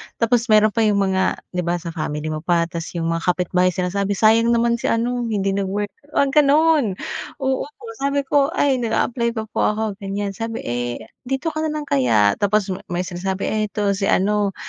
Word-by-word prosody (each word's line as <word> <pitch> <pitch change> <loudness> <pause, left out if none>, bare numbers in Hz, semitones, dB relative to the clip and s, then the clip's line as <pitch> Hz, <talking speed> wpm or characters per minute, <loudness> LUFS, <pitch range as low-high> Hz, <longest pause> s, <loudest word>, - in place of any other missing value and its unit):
tapos 235 +1 +1
meron 215 -1 +5
pa 230 - -2
’yong 215 -2 +3
mga, 190 -1 0
’di 180 - -3
ba, 175 0 0
sa 170 -1 -5
family 155 -1 -3
mo 155 - -3
pa, 170 +1 +1
tapos 170 0 -6
’yong 165 -1 -1
mga 165 0 -1
kapitbahay 180 0 +2
sinasabi, 195 +2 -1
sayang 230 +2 +4
naman 235 0 +1
si - - -2
ano, 240 +1 0
hindi 200 -3 0
nag-work, 200 +1 -2 0.2
mga 280 +1 +4
gano’n. 295 - +3 0.5
Oo, 265 +1 0
so 300 +9 -21 0.2
sabi 280 0 0
ko, 275 0 +2
ay, 270 -3 +2
nag-aapply 235 +1 0
pa 220 - -2
po - - -3 0.2
ako, 220 - -2 0.2
ganyan. 200 0 -3
Sabi, 225 +3 -5
eh, 120 0 -3 0.2
dito 270 +5 -1
ka 310 - -4
na - - -2
lang 305 0 -3
kaya, 115 - +2
tapos 205 -1 +1
me 185 - -4
may 175 0 -2
sinasabi, 190 +1 -4
eh, 215 0 0
ito 205 -1 -1
si 195 0 -1
ano 205 0 +1
205 Hz, 200 wpm, -21 LUFS, 180-235 Hz, 0.5 s, meron